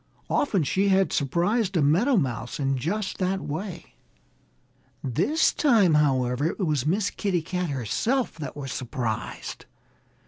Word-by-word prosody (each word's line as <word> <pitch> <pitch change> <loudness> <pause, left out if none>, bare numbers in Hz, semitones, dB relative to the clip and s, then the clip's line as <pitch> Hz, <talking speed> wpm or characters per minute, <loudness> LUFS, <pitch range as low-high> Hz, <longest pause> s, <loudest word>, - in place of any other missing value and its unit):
Often 200 - +2
she 190 +8 +1
had 195 -1 +3
surprised 180 - +1
a - - +3
meadow 205 - +3
mouse 130 -6 -2
in 135 -1 +1
just 190 - -2
that 190 +1 0
way. 175 +2 -6 1.1
This 180 - +2
time, 225 - +4
however, 135 -2 +2
it - - -3
was 150 - 0
Miss 200 +5 +1
Kitty 185 -5 -1
Cat 180 0 -2
herself 180 - -1
that 145 -2 -6
was 135 -3 -5
surprised. 120 -3 -4
170 Hz, 135 wpm, -26 LUFS, 140-200 Hz, 1.1 s, time